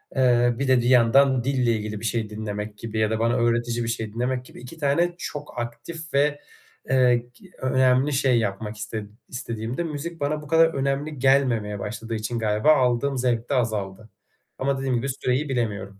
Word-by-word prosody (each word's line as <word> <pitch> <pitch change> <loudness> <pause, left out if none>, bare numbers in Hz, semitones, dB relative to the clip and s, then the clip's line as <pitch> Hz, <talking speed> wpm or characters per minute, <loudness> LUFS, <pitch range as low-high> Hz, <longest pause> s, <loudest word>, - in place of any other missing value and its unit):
eee, 120 -2 +3
bir 140 - 0
de 130 -1 +5
bir 120 - +1
yandan 130 +1 +5
dille 130 -3 +1
ilgili 105 -1 -4
bir 115 - -7
şey 110 -1 -1
dinlemek 105 0 -5
gibi 110 -1 -4
ya 110 -1 +2
da 110 - -1
bana 115 +1 +2
öğretici 120 0 +1
bir 115 - -3
şey 110 -2 -3
dinlemek 125 +2 -2
gibi... - - -13
2 125 +6 -11
tane 170 +4 +1
çok 145 -7 -6
aktif 155 +8 -7
ve, 145 +1 +2 0.5
eee, 125 -2 +5 0.2
gi 185 +5 -18
önemli 130 +2 +3
şey 130 -3 +3
yapmak 105 +1 -3
iste 105 0 -5 0.2
istediğimde, 115 +4 -4
müzik 165 +2 -5
bana 150 +1 -1
bu 150 - -11
kadar 165 +2 +5
önemli 140 +2 -2
gelmemeye 125 -6 +2
başladığı 115 +2 -5
için 110 +2 -3
galiba 110 +7 +3
aldığım 130 +1 +1
zevk 120 -1 0
de - - 0
azaldı. 110 -3 -2 0.5
Ama 135 +1 0
dediğim 135 -2 -1
gibi, 130 +4 -1
süreyi 130 +2 -1
bilemiyorum. 105 -6 -3
125 Hz, 185 wpm, -24 LUFS, 110-135 Hz, 0.5 s, de